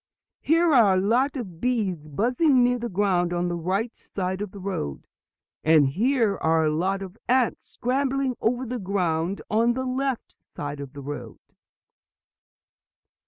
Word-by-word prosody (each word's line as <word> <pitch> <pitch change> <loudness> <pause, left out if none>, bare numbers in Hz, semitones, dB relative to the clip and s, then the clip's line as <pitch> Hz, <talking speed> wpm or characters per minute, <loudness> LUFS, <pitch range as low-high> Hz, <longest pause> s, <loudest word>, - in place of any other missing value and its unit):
"Here 330 +1 +3
are 215 -7 +6
a - - +3
lot 245 +9 +2
of 185 -11 -7
bees 200 -11 -1
buzzing 250 - +3
near 245 0 +2
the 235 0 -3
ground 180 -2 +1
on 175 0 0
the 175 - -2
right 190 +7 -1
side 190 0 -4
of 205 - -3
the 200 - -12
road. 180 - -4 0.6
And 155 -3 +5
here 225 - +1
are 160 0 +2
a 155 - +2
lot 190 +5 0
of 195 +3 -10
ants 255 -1 +2
scrambling 265 +1 -1
over 245 +3 0
the 250 +1 -4
ground 180 -2 -1
on 230 +2 +2
the 260 +1 -3
left 260 -1 -2
side 145 0 -7
of 140 -1 -8
the 140 - -8
road." 145 +1 -7
200 Hz, 160 wpm, -25 LUFS, 175-250 Hz, 0.6 s, are